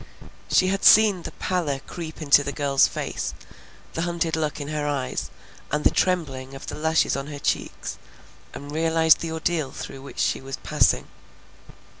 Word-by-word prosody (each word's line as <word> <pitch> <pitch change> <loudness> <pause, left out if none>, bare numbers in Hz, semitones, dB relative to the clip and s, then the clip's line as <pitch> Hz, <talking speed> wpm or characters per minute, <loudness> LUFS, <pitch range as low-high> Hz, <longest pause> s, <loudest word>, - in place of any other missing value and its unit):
She 185 - +4
had 195 +1 -1
seen 210 -4 +7
the - - -7
pallor 170 -7 -1
creep 160 -2 -7
into 145 -1 +5
the 140 - -3
girl's 140 -1 +3
face, - - -4 0.6
the 165 - -2
hunted 170 -1 -1
look 155 -2 -2
in 145 0 -5
her 150 -1 -2
eyes, 140 -3 -2 0.4
and 150 0 0
the - - +5
trembling 135 -8 -1
of 135 - -9
the - - -6
lashes 160 +1 +1
on 140 0 -4
her 145 -1 -6
cheeks, - - -3 0.5
and 145 +1 -9
realized 160 0 +4
the 165 - -4
ordeal 160 -3 -1
through 135 - -8
which 140 - -11
she - - +1
was 135 0 -6
passing. - - +2
155 Hz, 170 wpm, -24 LUFS, 140-165 Hz, 0.6 s, seen